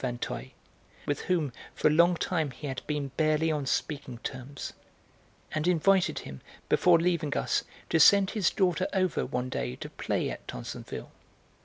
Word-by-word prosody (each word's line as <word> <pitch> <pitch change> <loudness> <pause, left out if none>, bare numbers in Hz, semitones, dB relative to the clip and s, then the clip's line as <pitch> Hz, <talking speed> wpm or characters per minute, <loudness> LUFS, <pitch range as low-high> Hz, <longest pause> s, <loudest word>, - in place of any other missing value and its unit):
Vinteuil, 120 -2 -3 0.6
with 145 - -1
whom 160 -8 0 0.2
for - - +3
a - - +4
long 170 +3 +5
time 160 -3 0
he 135 +3 -9
had 130 -2 -3
been 145 -2 -2
barely 155 0 +2
on 145 -3 -2
speaking 140 -5 -2
terms, 130 +1 -6 0.8
and 155 +2 -1
invited 180 +2 +3
him, 65 -1 -7 0.3
before 175 -1 +5
leaving 165 -3 0
us, - - +1 0.3
to 160 - +4
send 195 +4 +7
his 205 -6 +2
daughter 185 -1 +1
over, 185 -6 +1
one 125 +1 -2
day, 60 - -3
to - - -8
play - - -1
at - - -9
Tansonville. - - -7
155 Hz, 160 wpm, -29 LUFS, 135-180 Hz, 0.8 s, send